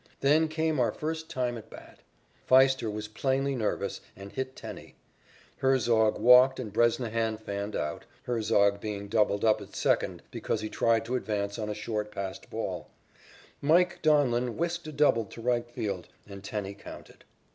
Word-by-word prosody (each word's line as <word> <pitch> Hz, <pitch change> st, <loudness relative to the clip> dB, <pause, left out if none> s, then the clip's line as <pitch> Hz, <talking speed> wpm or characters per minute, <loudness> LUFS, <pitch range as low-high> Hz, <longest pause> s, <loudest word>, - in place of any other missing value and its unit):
Then 155 Hz, +3 st, +4 dB
came 160 Hz, -1 st, -1 dB
our 120 Hz, -, +2 dB
first 160 Hz, +1 st, -4 dB
time 125 Hz, -2 st, -2 dB
at 110 Hz, 0 st, -15 dB
bat. -, -, -13 dB, 0.5 s
Pfiester 130 Hz, -3 st, +5 dB
was 105 Hz, 0 st, -5 dB
plainly 135 Hz, +5 st, 0 dB
nervous 115 Hz, -5 st, -2 dB
and 100 Hz, +1 st, -10 dB
hit 130 Hz, 0 st, -4 dB
Tenney. -, -, -9 dB, 0.6 s
Herzog 120 Hz, -5 st, +3 dB
walked 125 Hz, +2 st, +6 dB
and 110 Hz, -6 st, -6 dB
Bresnahan 115 Hz, -1 st, +1 dB
fanned 100 Hz, -1 st, -5 dB
out, 75 Hz, -, -3 dB, 0.2 s
Herzog 105 Hz, -4 st, +2 dB
being 100 Hz, -2 st, -4 dB
doubled 105 Hz, -1 st, +2 dB
up 110 Hz, -1 st, +3 dB
at -, -, -12 dB
second -, -, 0 dB
because 110 Hz, -, -2 dB
he 110 Hz, -, -4 dB
tried 115 Hz, 0 st, +1 dB
to 125 Hz, +3 st, -2 dB
advance 100 Hz, -2 st, -2 dB
on 105 Hz, -1 st, -3 dB
a 105 Hz, -, -3 dB
short 105 Hz, -1 st, -3 dB
passed 95 Hz, -2 st, -6 dB
ball. -, -, -4 dB, 0.7 s
"Mike" 175 Hz, +4 st, +3 dB
Donlin 125 Hz, -6 st, +2 dB
whisked 170 Hz, 0 st, -2 dB
a -, -, -5 dB
double 140 Hz, -6 st, +3 dB
to 110 Hz, -, -12 dB
right 120 Hz, 0 st, 0 dB
field 100 Hz, -6 st, -4 dB, 0.2 s
and 100 Hz, -1 st, -10 dB
Tenney 100 Hz, -1 st, -4 dB
counted. 100 Hz, -, -12 dB
115 Hz, 160 wpm, -29 LUFS, 105-130 Hz, 0.7 s, walked